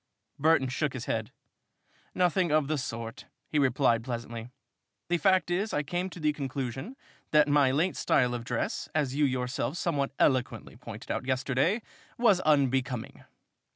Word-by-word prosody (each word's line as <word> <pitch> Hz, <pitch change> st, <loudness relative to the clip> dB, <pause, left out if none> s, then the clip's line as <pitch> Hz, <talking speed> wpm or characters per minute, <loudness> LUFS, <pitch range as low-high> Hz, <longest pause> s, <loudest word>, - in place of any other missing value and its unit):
Burton 150 Hz, -2 st, +4 dB
shook 140 Hz, +3 st, -1 dB
his 125 Hz, -2 st, -5 dB
head. 110 Hz, -1 st, -2 dB, 0.8 s
"Nothing 180 Hz, -1 st, +2 dB
of 155 Hz, -2 st, +3 dB
the 155 Hz, -1 st, 0 dB
sort," 115 Hz, -2 st, -6 dB, 0.2 s
he 150 Hz, -, 0 dB
replied 130 Hz, -4 st, +2 dB
pleasantly. 115 Hz, -1 st, -5 dB, 0.6 s
"The 175 Hz, -1 st, +2 dB
fact 185 Hz, -2 st, +3 dB
is 200 Hz, +5 st, 0 dB
I 150 Hz, -, +1 dB
came 175 Hz, +6 st, -2 dB
to 180 Hz, -, -10 dB
the 150 Hz, -1 st, +1 dB
conclusion 135 Hz, -, -4 dB, 0.3 s
that 150 Hz, -1 st, +5 dB
my 145 Hz, -2 st, +4 dB
late 160 Hz, +7 st, +1 dB
style 125 Hz, -3 st, +2 dB
of 120 Hz, -1 st, -4 dB
dress, 120 Hz, -1 st, -3 dB
as 145 Hz, -4 st, +1 dB
you 145 Hz, +1 st, +2 dB
yourself 130 Hz, +3 st, -1 dB
somewhat 145 Hz, -6 st, 0 dB
eloquently 125 Hz, -5 st, +1 dB
pointed 115 Hz, 0 st, -8 dB
out 125 Hz, -, -3 dB
yesterday, 135 Hz, -, +1 dB, 0.3 s
was 220 Hz, -6 st, +4 dB
unbecoming." 135 Hz, -6 st, 0 dB
140 Hz, 155 wpm, -29 LUFS, 125-155 Hz, 0.8 s, that